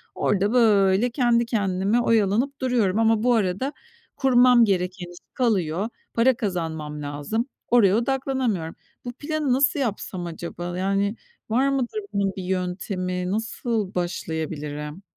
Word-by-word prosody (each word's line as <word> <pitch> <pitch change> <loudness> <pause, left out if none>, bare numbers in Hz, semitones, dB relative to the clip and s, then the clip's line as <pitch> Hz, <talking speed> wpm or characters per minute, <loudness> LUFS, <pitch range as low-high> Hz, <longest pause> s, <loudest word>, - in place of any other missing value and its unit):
Orada, 205 +3 +1
böyle, 210 -1 +4
kendi 240 -2 +2
kendime 200 0 +1
oyalanıp 230 +6 +1
duruyorum. 225 -6 +1
Ama 225 0 +3
bu 245 -1 +4
arada, 215 +6 0 0.4
kurmam 250 -2 +5
gereken 180 -2 -1
iş 175 - -13 0.2
kalıyor. 200 -4 0 0.2
Para 250 +3 +4
kazanmam 160 -8 -3
lazım. 145 - -3 0.2
Oraya 210 -5 +5
odaklanamıyorum. 255 -9 -1 0.3
Bu 245 - -5
planı 295 -1 -1
nasıl 280 +2 +3
yapsam 200 -7 -3
acaba? 175 +1 -6
Yani, 200 +3 0 0.3
var 260 +5 +2
mıdır 275 - -1
bunun 195 -1 +1
bir 190 - -5
yöntemi? 180 0 -2
Nasıl 220 -2 -2
başlayabilirim? 160 -2 -4
205 Hz, 125 wpm, -24 LUFS, 180-245 Hz, 0.4 s, kurmam